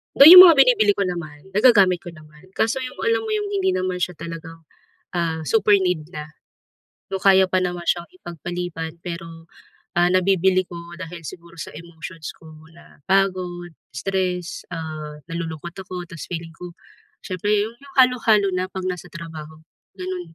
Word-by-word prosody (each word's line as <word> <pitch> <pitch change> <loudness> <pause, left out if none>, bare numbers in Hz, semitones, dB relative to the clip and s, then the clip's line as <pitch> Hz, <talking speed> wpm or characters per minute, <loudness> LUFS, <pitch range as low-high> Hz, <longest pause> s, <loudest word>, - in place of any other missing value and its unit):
Though - - +8
yung 365 +1 +13
mga 335 -3 +7
binibili 235 -6 +5
ko 200 - 0
naman, 170 -1 -7
nagagamit 200 -6 +5
ko 175 - -8
naman, 155 +4 -17
kaso 225 +4 0
yung, 255 - -7
alam 460 +1 +2
mo 440 - -4
yung 415 -1 -2
hindi 380 -2 +1
naman 185 0 -2
siya 180 - -1
talagang, 165 0 -9 0.5
ah, 165 -2 -1
super 210 -2 +3
need 180 -5 -1
na. 150 0 -6 0.9
Though 190 - -3
kaya 190 -1 +6
pa 185 - +2
naman 180 -1 -3
siyang 170 -1 0
ipag-paliban 170 -1 -6
pero, 165 -1 -8 0.5
ah, 175 0 +4
nabibili 185 0 +2
ko 175 - -10 0.3
dahil 170 -1 -8
siguro 170 +1 -11
sa - - -6
emotions 165 0 -9
ko 160 - -15 0.3
na 170 - -18
pagod, 185 -3 0 0.2
stress, 180 +3 -3
ah, 155 -2 -6
nalulungkot 165 0 -6
ako, 180 -1 -6
tapos 170 -3 -9
feeling 165 -1 -6
ko, 180 0 -9 0.5
siyempre 185 +2 -3 0.2
'yon 230 - -10
yung 280 0 -16
halo-halo 230 -5 +3
na 185 0 -2
'pag 190 -1 -6
nasa 180 -1 -5
trabaho, 160 -2 -9 0.4
gano'n. 180 -2 -6
180 Hz, 160 wpm, -22 LUFS, 165-190 Hz, 0.9 s, yung